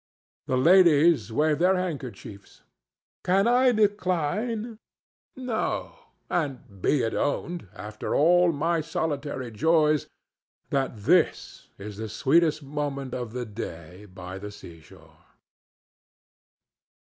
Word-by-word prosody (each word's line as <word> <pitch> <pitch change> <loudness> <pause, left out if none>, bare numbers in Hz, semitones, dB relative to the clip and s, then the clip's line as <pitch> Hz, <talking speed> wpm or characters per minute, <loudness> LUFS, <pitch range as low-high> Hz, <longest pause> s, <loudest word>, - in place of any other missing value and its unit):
The 130 - +1
ladies 160 - +5
wave 150 +5 +1
their 185 +2 +4
handkerchiefs. 130 - -7 0.6
Can 195 +4 +3
I 250 +1 +4
decline? 210 +2 -1 0.6
No; 250 -4 -3 0.3
and 130 - -4
be 145 +6 +2
it 115 - -1
owned, 170 - -2
after 105 0 -5
all 175 +3 +4
my 165 +2 0
solitary 145 -5 -3
joys, 155 +5 +2 0.6
that 135 -4 -1
this 160 - +1
is 100 0 -8
the 110 0 -5
sweetest 155 - +2
moment 140 -2 -4
of 120 -2 -5
a 125 -1 -3
day 90 -3 -8
by 95 -1 -9
the 105 +1 -7
seashore. 85 -6 -15
145 Hz, 105 wpm, -26 LUFS, 110-175 Hz, 0.6 s, ladies